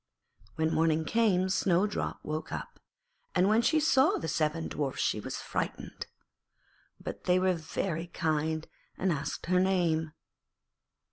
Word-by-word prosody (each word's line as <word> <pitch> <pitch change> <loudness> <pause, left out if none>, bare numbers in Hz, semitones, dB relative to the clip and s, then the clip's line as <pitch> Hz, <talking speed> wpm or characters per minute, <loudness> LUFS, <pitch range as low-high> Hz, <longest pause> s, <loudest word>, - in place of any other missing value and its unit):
When 160 0 +1
morning 160 0 +2
came 195 -3 +2
Snowdrop 190 +1 +1
woke 155 +1 -4
up, - - -6 0.6
and 180 +1 +4
when 215 +2 +4
she 310 +6 +3
saw 290 -2 +4
the 160 - -4
seven 160 +1 0
Dwarfs 140 -3 -2
she - - +1
was - - -5
frightened. - - -4 0.9
But - - -7
they 180 0 +4
were 185 0 +3
very 165 0 -3
kind 160 -1 -1 0.3
and 190 - +1
asked 140 -2 -4
her 180 +1 +3
name. 170 -4 +1
170 Hz, 135 wpm, -30 LUFS, 160-190 Hz, 0.9 s, and